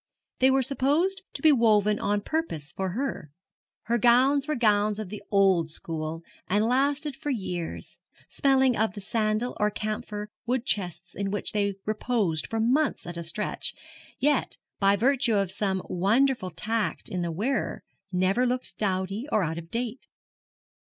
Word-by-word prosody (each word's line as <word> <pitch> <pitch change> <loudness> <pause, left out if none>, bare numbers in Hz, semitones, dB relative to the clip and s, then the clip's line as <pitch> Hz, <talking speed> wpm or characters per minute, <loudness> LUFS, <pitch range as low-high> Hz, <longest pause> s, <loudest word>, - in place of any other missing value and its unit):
They 260 - +5
were 265 0 +3
supposed 295 +9 +2
to - - -8
be 315 - +7
woven 210 -5 +3
on 205 0 0
purpose 200 - -3
for 190 -1 -3
her. 250 - -3 0.5
Her 235 +2 0
gowns 260 +5 +4
were 305 - 0
gowns 210 -3 +2
of 215 -4 -5
the 210 +1 -7
old 190 -5 +3
school, 160 0 -4 0.2
and 205 +3 +2
lasted 280 +4 +1
for 295 +1 -5
years, 180 - -4 0.3
smelling 265 -2 +3
of 220 -2 0
the - - -5
sandal 215 +3 -1
or 210 - +3
camphor 210 0 -4 0.2
wood 250 0 0
chests 175 -5 -2
in 200 -1 -3
which 205 +1 +1
they 200 -2 0
reposed 215 -7 0
for 225 - -2
months 265 +6 +1
at 175 0 -6
a 170 - -4
stretch, 170 +6 -2 0.4
yet, 290 -2 +1 0.2
by 195 0 +4
virtue 245 +1 +2
of 195 -3 +1
some 190 -1 -1
wonderful 215 +3 +2
tact 210 0 -2
in 180 - 0
the 170 -1 -2
wearer, 215 +8 -2 0.3
never 190 +7 +2
looked 250 +1 -3
dowdy 195 +4 -1
or 210 - +3
out 165 0 -2
of 165 0 -11
date. 240 +3 -4
215 Hz, 160 wpm, -27 LUFS, 190-255 Hz, 0.5 s, be